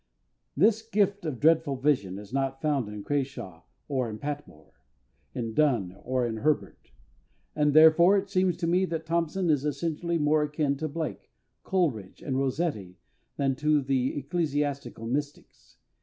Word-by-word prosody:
This 215 +7 +4
gift 205 -3 0
of 130 -6 -4
dreadful 160 -2 +3
vision 130 -9 0
is 105 +2 -11
not 135 -1 -1
found 140 -7 0
in 105 -1 -7
CRASHAW 130 - -3 0.3
or 130 -5 -1
in 105 - -6
PATMORE, 140 - -7 0.6
in 115 -3 -3
DONNE 115 -11 +1
or 130 0 0
in 115 -1 -3
HERBERT, 150 +6 -2 0.6
and 150 -1 +2
therefore 160 +5 +7
it 200 0 -1
seems 185 -2 +1
to 175 - -2
me 180 +3 +2
that 165 -2 -4
THOMPSON 170 +1 0
is 145 -3 +1
essentially 165 +3 -1
more 150 0 +2
akin 150 -1 0
to 155 +2 -3
BLAKE, 160 +1 -5 0.3
COLERIDGE 140 - -1
and 135 - -2
ROSSETTI 135 - -2 0.4
than 135 -1 +1
to 150 +1 +3
the 130 0 0
ecclesiastical 145 -4 -2
mystics. 145 +4 -5
145 Hz, 150 wpm, -27 LUFS, 130-165 Hz, 0.6 s, therefore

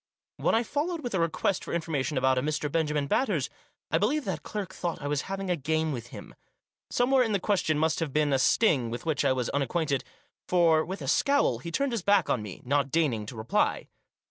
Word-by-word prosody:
When - - +2
I 230 - +3
followed 310 +7 -2
with 245 -6 -4
a 190 - +1
request 165 +3 0
for - - -3
information 155 -4 -1
about 130 0 +3
a - - -1
Mr. 150 +1 -2
Benjamin 150 -2 0
Batters, 170 - 0 0.4
I 160 - +3
believe 270 - +1
that - - -3
clerk 200 -3 -5
thought 175 -2 -3
I 145 - -7
was 145 +4 -2
having 195 -1 -2
a - - +2
game 160 +1 -1
with 120 -4 -5
him. - - -10 0.6
Somewhere 255 +2 +3
in 225 -4 +1
the 200 - +2
question 180 -6 +1
must 160 +1 +1
have 160 -4 -2
been 150 0 +1
a 135 - +3
sting, 130 - +3
with 120 +6 -6
which 160 -4 0
I - - +3
was 130 -2 -1
unacquainted; 140 0 0 0.4
for, 165 -3 +4
with 190 +4 -6
a - - -5
scowl, 280 - +2
he 170 - -6
turned 275 +9 0
his 230 -4 -1
back 200 -1 +3
on 120 - +1
me, 105 -3 -9
not 140 +1 +1
deigning 130 -10 0
to 120 - -7
reply. 110 +1 0
160 Hz, 220 wpm, -28 LUFS, 140-195 Hz, 0.6 s, for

